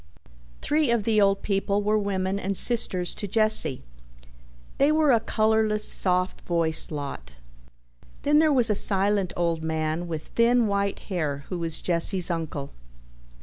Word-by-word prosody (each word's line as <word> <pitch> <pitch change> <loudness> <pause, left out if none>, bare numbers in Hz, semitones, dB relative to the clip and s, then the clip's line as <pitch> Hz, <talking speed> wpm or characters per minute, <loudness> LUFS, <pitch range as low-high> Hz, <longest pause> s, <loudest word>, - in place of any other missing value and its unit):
Three 300 -2 0
of 235 -3 +1
the 215 0 +2
old 195 0 +1
people 200 0 -1
were 210 +1 +1
women 195 -1 -2
and 195 0 -3
sisters 185 -7 +2
to 205 - -6
Jesse. 215 - 0 1.0
They 280 +2 +3
were 310 -2 +3
a 235 - +4
colorless, 215 -1 +1
soft 185 0 -1
voiced 165 -2 +2
lot. 140 - -7 0.9
Then 295 +1 +3
there 315 -1 +3
was 245 -6 +6
a - - +3
silent 200 -1 0
old 170 -2 -1
man 160 +1 -3
with 160 -2 -7
thin 235 +1 +2
white 200 -1 -1 0.2
hair 145 -5 -3
who 180 - -4
was 165 -1 0
Jesse's 175 +1 +1
uncle. 155 -4 -5
195 Hz, 145 wpm, -24 LUFS, 170-220 Hz, 1.0 s, was